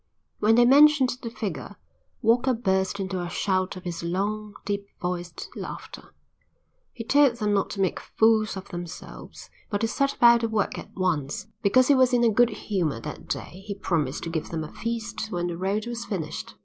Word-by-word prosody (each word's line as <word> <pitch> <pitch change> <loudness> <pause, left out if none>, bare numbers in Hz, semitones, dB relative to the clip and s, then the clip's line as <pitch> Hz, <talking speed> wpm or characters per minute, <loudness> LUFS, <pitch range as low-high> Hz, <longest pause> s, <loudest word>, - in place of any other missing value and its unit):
When 220 +2 +4
they 240 +1 +6
mentioned 280 -1 +6
the 230 - -4
figure, 200 - -5 0.5
Walker 240 +3 +3
burst 190 -3 0
into 190 -1 -2
a 175 - -4
shout 185 +1 0
of 185 - -9
his 175 -2 -4
long, 205 +4 -2
deep 200 0 -2
voiced 180 -2 -4
laughter. - - -8 0.8
He 230 - -7
told 280 +1 +4
them 210 -3 0
not 200 - +1
to 195 - -3
make 190 - 0
fools 220 -2 +2
of 190 - -8
themselves, 175 -1 -9 0.2
but 205 - -1
to 225 - +2
set 275 +4 0
about 235 -1 +6
the 230 - 0
work 215 -3 -1
at - - -10
once. 160 -7 -1 0.2
Because 255 +6 +4
he 285 - +6
was 260 -1 +4
in 240 -1 +4
a 230 - +5
good 240 +2 +5
humour 175 - -2
that - - -8
day 185 - -5
he 200 - -3
promised 155 -9 -1
to 165 - -4
give 160 -2 -3
them 160 -1 -3
a 155 - -9
feast 230 -1 -4
when 175 -1 -1
the 175 -1 -3
road 195 +4 -1
was 235 -1 -4
finished. 180 -9 -5
205 Hz, 195 wpm, -26 LUFS, 180-235 Hz, 0.8 s, they